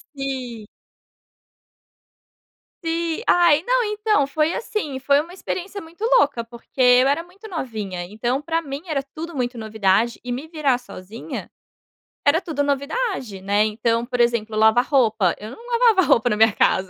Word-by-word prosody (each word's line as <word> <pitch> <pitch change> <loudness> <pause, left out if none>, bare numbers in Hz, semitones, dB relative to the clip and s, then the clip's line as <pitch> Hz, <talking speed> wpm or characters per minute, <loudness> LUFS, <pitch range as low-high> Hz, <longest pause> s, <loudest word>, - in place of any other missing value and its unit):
Sim. 255 -5 -5 2.2
Sim. 330 +3 -2
Ai, 340 -3 +5
não, - - +3
então, 420 -8 +1
foi 310 +3 0
assim, 355 - -3
foi 280 +1 +3
uma 340 +3 -11
experiência 385 +2 -5
muito 330 +6 -11 0.2
louca, 235 -5 +1
porque 235 +3 -15
eu 250 +1 +6
era 295 +4 +1
muito 385 +5 -14
novinha. 215 - -4
Então, 240 +8 -2
para 330 +2 -1
mim 280 -2 -6
era 285 -4 -1
tudo 330 0 -6
muito 245 -1 -2
novidade, 220 +1 +1
e 245 - -5
me 265 +6 -4
virar 300 -6 +1
sozinha, 220 -3 -8 0.8
era 315 +5 +4
tudo 310 -4 -3
novidade, 280 - -2
né. 205 +2 +2
Então, 230 +2 0
por 245 0 -4
exemplo, 235 -2 +1
lavar 220 +3 +4
roupa, 220 - +2
eu 215 +1 -8
não 465 - -12
lavava 470 -5 +4
roupa 240 +1 +4
na 210 - +1
minha 220 -1 +5
casa. 190 -1 +1
270 Hz, 155 wpm, -22 LUFS, 230-330 Hz, 2.2 s, eu